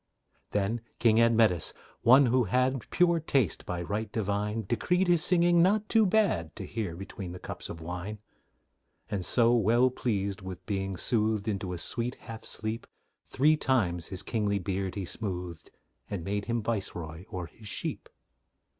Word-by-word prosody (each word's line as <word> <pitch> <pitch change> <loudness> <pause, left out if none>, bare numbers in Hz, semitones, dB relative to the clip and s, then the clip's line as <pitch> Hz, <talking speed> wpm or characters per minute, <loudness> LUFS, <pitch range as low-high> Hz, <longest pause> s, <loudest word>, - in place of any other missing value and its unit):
Then 105 +3 -1 0.2
King 115 -1 +4
Admetus, 115 -7 +3 0.3
one 130 +4 +7
who 125 0 +3
had 130 0 0
Pure 170 -1 +3
taste 140 -7 0
by 90 -1 -3
right 105 +4 -3
divine, 105 +1 -1
Decreed 180 - +1
his 175 -2 +4
singing 175 -1 +4
not 205 +4 +3
too 220 -2 +5
bad 175 - +1
To 95 - -6
hear 100 -5 -4
between 95 0 -7
the 90 - -8
cups - - -7
of 80 - -7
wine: 90 +5 -5 0.9
And 100 -3 -1
so, 120 +5 +4
well 120 +3 +4
pleased 100 -6 -2
with 95 -1 -8
being 95 -2 -2
soothed 110 0 +1
Into 100 -3 -2
a 90 - -3
sweet 120 +7 -1
half 115 -2 -10
sleep, 110 +1 -4 0.4
Three 150 +4 +3
times 95 - 0
his 95 -2 -4
kingly 105 -3 0
beard 95 0 -3
he 100 -2 -3
smoothed, 90 -4 -5 0.4
And 95 -5 -4
made 100 +2 -2
him 115 -1 -1
viceroy 90 -6 -4
o'er 90 -1 -4
his 105 +7 -11
sheep. - - -1
110 Hz, 160 wpm, -29 LUFS, 95-125 Hz, 0.9 s, one